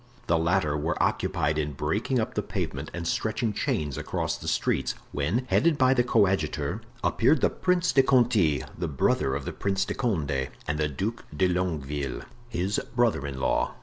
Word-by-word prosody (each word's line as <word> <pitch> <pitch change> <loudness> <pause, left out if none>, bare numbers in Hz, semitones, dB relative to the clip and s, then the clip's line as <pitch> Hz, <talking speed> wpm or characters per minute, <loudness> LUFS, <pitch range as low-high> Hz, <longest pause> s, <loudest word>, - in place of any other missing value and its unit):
The 85 -1 +2
latter 85 -2 +1
were 75 +3 -1
occupied 75 +1 +1
in 75 -1 -2
breaking 105 - 0
up 110 - -2
the - - 0
pavement 70 +2 -4
and 85 -1 -4
stretching 110 +2 -1
chains 75 -7 -1
across - - -2
the - - -9
streets, - - 0 0.2
when, 90 - 0
headed 155 +3 +3
by 130 -2 +5
the 125 -2 +3
coadjutor, 95 - +1 0.2
appeared 130 +7 +3
the - - +3
Prince 180 -1 +1
de 135 - +6
Conti 115 - +3
(the 85 - -3
brother 65 -2 +1
of 70 -1 -4
the - - -4
Prince 95 -1 0
de - - -3
Condé) 75 - -1 0.2
and 75 +1 -1
the 75 - +2
Duc 100 - -3
de 95 - +4
Longueville, 75 -7 -2 0.3
his 95 -1 -1 0.2
brother 115 - +2
in 65 -2 -5
law. - - 0
90 Hz, 180 wpm, -27 LUFS, 75-115 Hz, 0.3 s, de